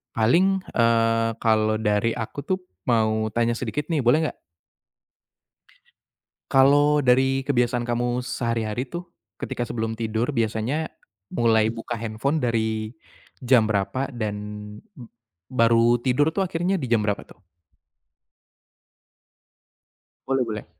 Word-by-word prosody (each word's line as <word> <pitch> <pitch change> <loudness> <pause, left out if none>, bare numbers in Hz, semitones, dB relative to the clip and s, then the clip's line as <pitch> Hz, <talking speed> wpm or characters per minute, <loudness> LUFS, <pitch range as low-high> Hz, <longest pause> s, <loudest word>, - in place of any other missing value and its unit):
paling, 180 - +3
eee, 115 -1 +3
kalau 110 -1 +2
dari 105 +1 +1
aku 125 +5 -5
tuh 185 0 0 0.3
mau 110 -2 +2
tanya 120 0 +2
sedikit 135 +5 -3
nih 160 - +1
boleh 125 +6 +4
nggak? - - -15 2.1
Kalau 145 +2 +5
dari 130 +1 +3
kebiasaan 125 -3 0
kamu 120 +1 0
sehari-hari 115 -1 -2
tuh 175 +6 -8 0.3
ketika 120 - -3
sebelum 115 -1 -3
tidur 115 +3 -1
biasanya 115 +5 -1 0.5
mulai 110 -1 +2
buka 115 +1 -5
handphone 115 +7 -2
dari 110 -4 -1 0.5
jam 125 -3 +4
berapa 110 +6 -1
dan 110 -3 -3 1.1
baru 115 -1 +4
tidur 130 +5 +1
tuh 190 +3 -1
akhirnya 180 +2 -1
di 140 - -3
jam 115 -3 +2
berapa 105 -1 -2
tuh? 95 - -20 2.8
Boleh 135 -2 +1
boleh. 110 -2 -5
120 Hz, 115 wpm, -24 LUFS, 110-135 Hz, 2.8 s, Kalau